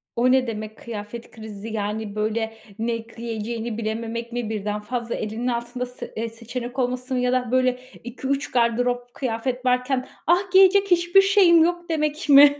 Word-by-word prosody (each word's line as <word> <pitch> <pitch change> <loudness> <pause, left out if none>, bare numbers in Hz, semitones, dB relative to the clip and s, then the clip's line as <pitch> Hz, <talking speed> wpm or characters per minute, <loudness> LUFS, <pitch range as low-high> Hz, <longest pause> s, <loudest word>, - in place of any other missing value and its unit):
O 245 +2 +3
ne 260 -1 +3
demek, 215 -1 -5
kıyafet 230 0 -7
krizi? 215 -1 -9
Yani, 210 -1 -3
böyle, 220 +1 -1 0.3
ne 230 0 -2
giyeceğini 230 0 -4
bilememek 230 +1 -3
mi, 240 -2 -3
birden 210 -1 -2
fazla 235 +2 -3
elinin 220 +3 -3
altında 240 +1 -2
sı 250 0 -9
eee, 230 +1 -2
seçenek 240 +3 -6
olması 255 +1 -1
mı 250 - +1
ya 250 0 +1
da, 250 -2 0
böyle, 255 -1 +2 0.2
2-3 270 +3 -3
gardırop 245 +1 +1
kıyafet 250 0 -3
varken, 255 +1 +1 0.2
"Ah, 360 +3 +3
giyecek 390 +1 +6
hiçbir 350 +2 +6
şeyim 385 -4 +6
yok!" 345 0 -1
demek 305 -1 -1
mi? 285 +1 +8
245 Hz, 160 wpm, -23 LUFS, 225-265 Hz, 0.3 s, mi